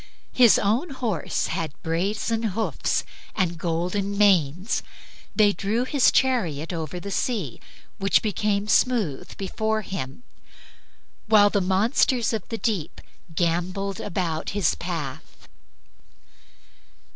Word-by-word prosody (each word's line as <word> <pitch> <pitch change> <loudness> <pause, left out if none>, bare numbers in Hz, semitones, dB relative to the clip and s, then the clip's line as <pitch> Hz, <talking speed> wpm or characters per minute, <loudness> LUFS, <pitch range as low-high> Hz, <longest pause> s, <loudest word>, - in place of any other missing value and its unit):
His 245 -4 +6
own 230 - +1
horses 230 - -2
had 160 -3 -4
brazen 200 +7 -1
hoofs 220 0 -1 0.3
and 175 -4 0
golden 180 +4 -1
manes. 185 -1 +3 0.5
They 205 -2 +5
drew 210 +6 -1
his 275 -1 +4
chariot 180 - +1
over 165 +1 -4
the 200 +3 -6
sea, 195 - -2 0.4
which 195 0 +3
became 210 -1 0
smooth 215 - +1
before 220 +2 -1
him, 190 - -6 1.0
while 205 -2 +6
the 200 - +2
monsters 225 +6 +2
of 215 -4 -4
the 225 - -3
deep 205 -10 -2 0.4
gambolled 180 +3 -1
about 170 -3 -2
his 190 -6 +3
path. 160 -5 -6
200 Hz, 110 wpm, -24 LUFS, 170-220 Hz, 1.0 s, His